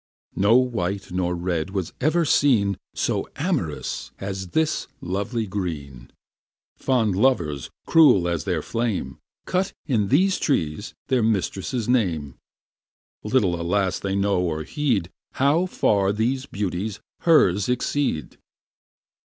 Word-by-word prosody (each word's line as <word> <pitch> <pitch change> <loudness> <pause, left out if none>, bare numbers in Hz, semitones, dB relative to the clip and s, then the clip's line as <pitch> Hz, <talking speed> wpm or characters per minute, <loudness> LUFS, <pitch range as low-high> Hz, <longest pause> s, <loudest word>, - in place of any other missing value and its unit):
No 100 +4 +4
white 100 -7 -1
nor 90 -1 -1
red 85 -1 -2
was 95 -4 -3
ever 160 +4 +2
seen 110 -10 +3 0.2
So - - -1
am'rous - - -2
as 95 -1 -5
this 160 - 0
lovely 100 +6 -2
green. 75 - -5 0.7
Fond 115 -7 +1
lovers, 85 - +1 0.2
cruel 130 - +5
as 85 -3 -1
their - - -1
flame, 110 - -2 0.3
Cut 185 +1 0
in 115 -9 +1
these 185 - +3
trees 80 - -1
their 130 -2 +3
mistress' 110 +2 -1
name; 85 - 0 0.9
Little, 100 -7 +1
alas, 95 +2 0
they 95 0 -2
know 100 -2 +1
or 80 -3 -2
heed 115 - -1 0.2
How 150 +7 +2
far 100 - +2
these 125 +6 -1
beauties 100 -1 -3 0.2
hers 105 - +4
exceed! 125 - -1
100 Hz, 120 wpm, -24 LUFS, 90-130 Hz, 0.9 s, cruel